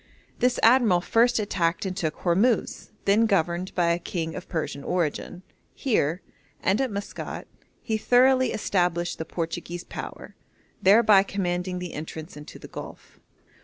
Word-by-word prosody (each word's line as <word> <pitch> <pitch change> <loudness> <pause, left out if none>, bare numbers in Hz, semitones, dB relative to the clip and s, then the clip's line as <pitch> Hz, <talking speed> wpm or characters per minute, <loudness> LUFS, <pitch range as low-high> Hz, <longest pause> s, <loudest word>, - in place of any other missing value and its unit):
This 250 0 +2
admiral 230 -6 +5
first 235 +5 +3
attacked 180 -5 0
and 185 -1 -3
took 160 -5 -2
Hormuz, 200 +7 +1 0.2
then 215 +3 +4
governed 180 -2 0
by 170 -2 +2
a 170 - 0
king 165 -2 -4
of 185 - -8
Persian 155 -4 -3
origin. 175 +1 -2 0.3
Here, 180 - 0 0.4
and 195 +6 +1
at 265 - 0
Maskat, 200 -1 -6 0.4
he 220 -2 -1
thoroughly 255 +3 +4
established 175 -4 0
the 160 - -3
Portuguese 170 +1 -4
power, - - -8 0.5
thereby 205 0 +6
commanding 180 -2 -2
the 180 -1 -6
entrance 155 +1 -7
into 150 0 -10
the - - -11
Gulf. - - -10
185 Hz, 140 wpm, -25 LUFS, 170-215 Hz, 0.5 s, thereby